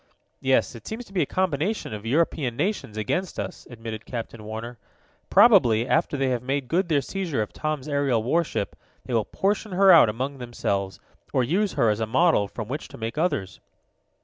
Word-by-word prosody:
"Yes, 130 +1 +2
it 115 -3 -11
seems 230 +3 -5
to 195 - -17
be 185 - +1
a 145 - +1
combination 185 - -1
of 105 +1 -6
European 140 -2 +1
nations 185 - -2
against 140 - -2
us," - - -6
admitted 115 -2 -7
Captain 115 -2 -6
Warner. 110 +2 -7 0.5
"Probably, 115 0 +6
after 160 -1 +1
they 135 -1 +1
have 125 -2 0
made 135 +1 -2
good 175 +5 0
their 145 -3 +3
seizure 160 - -2
of 105 - -10
Tom's 155 -2 -3
aerial 140 -6 +1
warship, 150 -5 -1 0.3
they 125 - -5
will 110 -3 +2
portion 205 +1 -1
her 195 +1 +6
out 165 -10 +8
among 130 +5 -3
themselves, 100 -6 -3 0.3
or 130 - +3
use 190 - 0
her 115 -2 +3
as 105 - -2
a 110 - -1
model 130 -3 +3
from 110 +1 -6
which 145 +6 -5
to - - -12
make 115 +1 -4
others." 100 - -1
130 Hz, 190 wpm, -25 LUFS, 115-165 Hz, 0.5 s, out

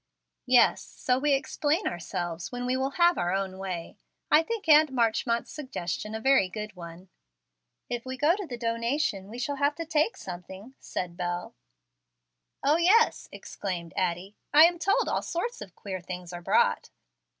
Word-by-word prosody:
"Yes, 245 -1 +5
so 250 0 -1
we 290 +1 +2
explain 305 +5 -1
ourselves 175 -1 -4
when 245 0 -4
we 250 +1 0
will 265 +1 -2
have 345 0 +4
our 175 - 0
own 190 0 -2
way. 180 -3 -5 0.3
I 300 - +7
think 425 +2 -5
Aunt 305 -1 +6
Marchmont's 235 -1 0
suggestion 215 - -5
a - - -3
very 265 -6 +3
good 210 +1 -6
one." 170 +1 -11 0.8
"If 240 -1 -4
we 260 0 -6
go 300 +6 +3
to 400 -3 -6
the 245 - -6
donation 230 -2 -1
we 230 - -8
shall 280 +3 -2
have 285 +1 +1
to 330 - -5
take 315 +6 +1
something," 190 +6 -9
said 175 -1 -5
Bel. 175 0 -3 1.1
"O, 295 +3 +4
yes," 400 +7 +3
exclaimed 175 -4 -6
Addie; 185 +2 -2 0.2
"I 300 +2 +8
am 345 +1 +4
told 395 +3 +2
all - - 0
sorts 470 +8 -4
of 185 - -10
queer 190 -3 -6
things 180 0 -7
are 175 - -6
brought. 475 - +2
235 Hz, 170 wpm, -28 LUFS, 185-300 Hz, 1.1 s, I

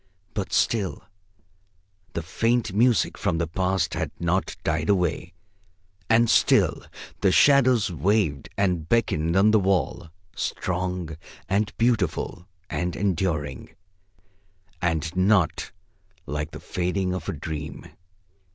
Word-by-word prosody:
But 100 -3 -3
still 105 -6 0 1.1
the 85 - -3
faint 115 +5 0
music 115 +2 +2
from 80 - 0
the 85 - 0
Past 95 +3 -1
had - - -2
not 85 +2 -1
died 80 +2 -1
away, 90 -3 0 0.7
and 115 +1 +5
still - - +3 0.4
the 95 - +3
shadows 130 -5 +5
waved 85 -3 0
and 90 -5 0
beckoned 85 -8 +1
on 100 +3 +5
the 110 - +5
wall, 95 -5 0 0.3
strong 90 -3 -3 0.3
and 105 +2 +1
beautiful, 100 -6 0 0.2
and 90 -1 -2
enduring, 80 -9 -2 1.1
and 80 -1 -1
not 95 -3 +2 0.5
like 75 +1 -3
the - - -9
fading 90 +1 -2
of 90 -3 -4
a - - -1
dream. 75 -1 -6
90 Hz, 115 wpm, -25 LUFS, 80-100 Hz, 1.1 s, and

